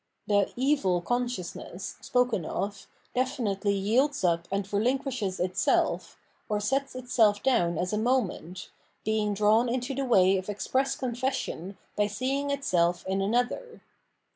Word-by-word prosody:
The 205 -2 +2
evil 255 -9 +2
con 245 +7 0
sciousness, 185 -4 -6
spoken 245 -5 +1
of, 200 +5 -4 0.3
definitely 220 -6 0
yields 245 +7 +1
up 170 -1 +1
and 200 0 0
relin 215 +7 +1
quishes 240 -9 -3
itself, 185 +1 +1 0.3
or 210 -1 +1
sets 270 +6 -1
itself 230 -5 +2
down 175 -11 +2
as 180 +4 -1
a 210 - +1
moment, 210 -7 -1 0.3
being 215 -1 +1
drawn 215 +4 +4
into 250 +2 -2
the 275 +1 -2
way 195 -6 +4
of 185 +2 -5
express 265 +6 0
confession 245 -7 -3 0.2
by 205 0 +2
seeing 265 +7 -1
itself 180 -11 +1
in 190 +1 0
another. 245 - -1
215 Hz, 140 wpm, -28 LUFS, 195-255 Hz, 0.3 s, drawn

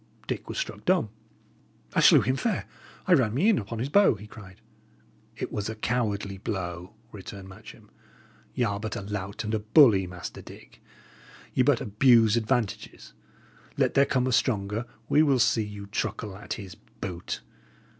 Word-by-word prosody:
Dick - - -5
was - - -5
struck - - -4
dumb. 180 - +2 0.8
"I - - +2
slew - - +7
him 130 - 0
fair. 215 - -1 0.4
I 185 - +4
ran 120 -8 +3
me 190 - +3
in 220 - +3
upon 115 +2 -6
his 120 +4 -2
bow," 200 - +5
he 105 +1 -11
cried. 100 -4 -13 0.8
"It - - -5
was 105 0 -3
a 110 - -5
coward 110 -2 -1 0.2
blow," 90 -2 -4 0.2
returned 100 -1 -9
Matcham. 105 +1 -14 0.6
"Y' 125 - +1
are 100 -3 -1
but 110 0 -4
a - - -4
lout 100 +1 -5
and 110 0 -4
bully, 110 - +7
Master 90 -1 -8
Dick; - - -14 0.7
ye - - +2
but 130 -1 +3
abuse 115 0 +4
advantages; 115 -1 -2 0.6
let - - +2
there 140 0 +4
come 130 -1 +1
a 130 - 0
stronger, 110 -1 0 0.2
we 150 - +4
will 140 -4 +3
see 115 -1 +3
you 105 -1 -8
truckle 100 0 -4
at 100 - -6
his 95 -5 -8
boot! 90 -2 -7
110 Hz, 165 wpm, -27 LUFS, 100-125 Hz, 0.8 s, slew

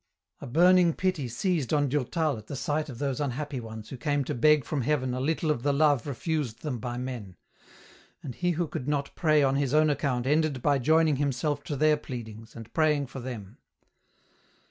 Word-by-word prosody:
A - - -8
burning 175 +4 +5
pity 185 -8 -1
seized 150 - -1
on 145 -2 +2
Durtal 150 +2 0
at 105 - -15
the 140 - -5
sight 150 +3 -2
of 125 - -8
those 140 +1 -2
unhappy 145 0 -3
ones 110 -2 -8
who 135 - -7
came 145 +2 0
to - - -3
beg 150 +2 +4
from 140 +3 -2
Heaven 130 -1 0
a 125 - -2
little 155 +3 0
of 120 - -2
the 145 - 0
76 140 - +2
EN - - -1
ROUTE. 155 -1 +6
love 140 -2 -2
refused 140 -3 -3
them 135 -6 -3
by 120 +2 -4
men; 120 -7 -6 0.9
and 130 - -6
he 180 +6 -1
who 170 +1 -1
could 130 - -5
not 145 -1 -1
pray 155 -3 +3
on 135 0 +2
his 140 0 0
own 155 0 +4
account 135 -4 -1
ended 150 -2 +1
by 145 -2 +3
joining 155 +2 +3
himself 145 +1 -1
to 145 - -3
their 155 +2 +3
pleadings, 115 -5 -8
and 115 -1 -10
praying 150 -3 +2
for 135 +1 -8
them. 120 -6 -8
140 Hz, 210 wpm, -28 LUFS, 125-155 Hz, 0.9 s, ROUTE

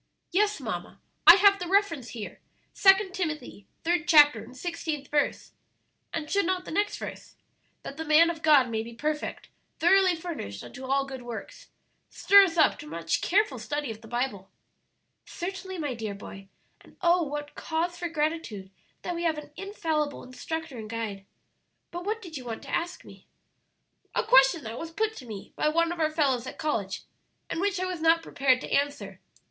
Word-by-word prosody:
"Yes, 415 +3 +2
mamma, - - -5 0.3
I 340 - +13
have 400 0 +5
the 355 - -4
reference 340 - +1
here; 220 -4 -7 0.3
Second 385 -1 +5
Timothy, 305 - -4 0.2
third 340 -1 0
chapter, 295 -3 +6
and 255 - -13
sixteenth 315 -3 -4
verse. 290 -1 0 0.6
And 315 -2 -4
should 400 +1 +1
not 370 -1 -1
the - - -7
next 410 +5 0
verse, - - -8 0.5
'That 275 - -8
the 320 - -4
man 320 +2 +6
of 325 -2 -9
God 285 -6 +5
may 220 -1 -1
be 230 +1 -9
perfect, 300 +4 -3 0.3
thoroughly 370 +2 +4
furnished 320 - -6
unto 260 +1 -9
all 275 +1 +1
good 265 -2 -7
works,' 240 - -8 0.4
stir 400 0 +6
us 340 -2 -4
up 310 - +4
to - - -9
much 165 +1 -2
careful 420 +4 +1
study 290 -4 -3
of 220 0 -10
the 225 - -13
Bible?" 240 -5 -3 0.8
"Certainly, 375 +1 -6
my 295 -5 -2
dear 220 -4 -5
boy; 195 -1 -10 0.4
and, - - -20
oh 350 0 +4
what 295 -1 -4
cause 335 +2 -2
for 345 0 -4
gratitude 300 -12 -3 0.3
that 355 - -3
we 340 - -4
have 325 -2 +1
an 295 -1 -9
infallible 320 -7 -2
instructor 310 +2 -6
and 215 -1 -8
guide! 210 -4 -5 0.6
But 350 +1 -6
what 440 +2 -2
did 330 -5 -7
you 255 - -8
want 230 -2 -6
to - - -9
ask 345 +1 -4
me?" - - -15 0.9
"A - - +2
question 270 +4 +5
that 225 +2 -6
was 330 - -5
put 435 +6 -1
to 255 - -10
me 210 -3 -9
by - - +1
one 335 +2 +2
of 345 - -5
our 310 -1 +2
fellows 270 -6 +1
at - - -8
college, 225 -12 -2 0.5
and 330 - -2
which 395 -1 0
I 370 - -1
was 365 -3 -4
not 330 0 +4
prepared 260 -4 +2
to - - -7
answer. 285 0 -1
310 Hz, 185 wpm, -27 LUFS, 255-350 Hz, 0.9 s, I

